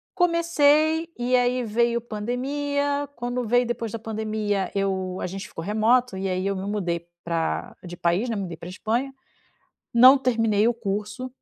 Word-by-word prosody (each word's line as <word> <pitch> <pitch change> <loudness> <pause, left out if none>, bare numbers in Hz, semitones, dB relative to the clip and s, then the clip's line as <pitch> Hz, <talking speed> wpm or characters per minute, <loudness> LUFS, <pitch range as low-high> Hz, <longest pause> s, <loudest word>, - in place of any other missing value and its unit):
Comecei, 330 -2 +3
e 245 +1 +1
aí 250 0 +2
veio 235 +2 +1
pandemia, 285 +6 -2
quando 245 +1 -3
veio 245 +2 +3
depois 235 -2 -3
da 230 - -4
pandemia 215 -3 -2
eu 190 -2 -1
a - - -3
gente 190 +2 -6
ficou 165 - -8
remoto, 220 +3 +2
e 190 0 -2
aí 185 +1 -1
eu 200 0 0
me 190 +1 -4
mudei 175 -5 -2 0.2
pra 165 - -2
de 175 -1 -8
país, 175 +9 +1
né, 225 - -1
me 200 - -2
mudei 170 -3 -6
pra 170 - -9
Espanha, 230 +8 -2 0.8
não 255 +3 +8
terminei 225 -4 +2
o - - +3
curso 210 +3 -4
225 Hz, 170 wpm, -24 LUFS, 195-250 Hz, 0.8 s, não